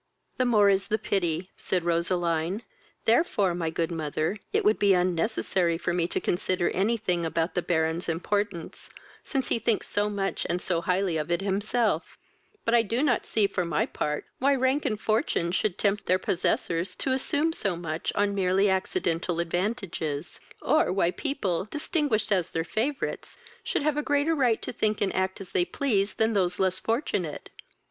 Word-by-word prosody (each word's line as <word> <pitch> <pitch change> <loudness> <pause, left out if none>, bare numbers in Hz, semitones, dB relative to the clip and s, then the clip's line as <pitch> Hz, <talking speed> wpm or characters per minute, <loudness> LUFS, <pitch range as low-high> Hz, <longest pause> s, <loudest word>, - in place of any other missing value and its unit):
"The 255 - +2
more 215 -4 +5
is 195 -1 +3
the 215 - +1
pity, 180 -4 -1
(said 180 -2 -1
Roseline;) 170 +3 0 0.4
therefore, 220 - +3
my 170 -2 -1
good 165 +1 -2
mother, 155 +3 -2
it - - +1
would 215 - +4
be 200 -2 +5
unnecessary 180 -1 +1
for 175 0 -2
me 170 -1 +1
to - - -2
consider 180 0 0
any 215 +5 +1
thing 180 -5 -1
about 165 +1 -1
the 180 - 0
Baron's 160 0 0
importance, 185 +1 -2 0.3
since 270 -3 -1
he - - +1
thinks 225 -1 0
so 205 0 0
much 195 -1 -2
and 175 +1 0
so 175 -2 0
highly 180 -1 +1
of 150 +1 -3
it 170 +2 +1
himself: 205 -1 0 0.5
but 230 - +1
I 235 - +6
do 230 +5 -1
not 250 -6 +1
see, 215 -2 +2
for 195 -2 -1
my 170 -3 0
part, 150 0 -3
why 275 +2 +3
rank 265 +3 +1
and 215 -2 -2
fortune 215 - 0
should 195 +1 0
tempt 205 0 0
their 185 - +4
possessors 180 0 -1
to 265 - -2
assume 290 +4 +1
so 195 - -1
much 165 -2 -3
on 205 0 +2
merely 195 +1 +2
accidental 180 - 0
advantages; 170 -4 -2 0.2
or 310 - +3
why 180 -2 +2
people, 195 - -2
distinguished 295 -7 -1
as 185 -4 +2
their 165 - 0
favourites, 235 - -3 0.3
should 460 -10 -1
have 300 -1 +1
a - - +2
greater 290 +2 +1
right 250 -7 +2
to - - -4
think 215 -1 0
and 200 - 0
act 190 0 -1
as 195 -2 -9
they 180 - +2
please 205 -2 0
than 220 0 +2
those 180 -3 +1
less 185 -1 +2
fortunate. 225 - -2
195 Hz, 180 wpm, -27 LUFS, 170-225 Hz, 0.5 s, I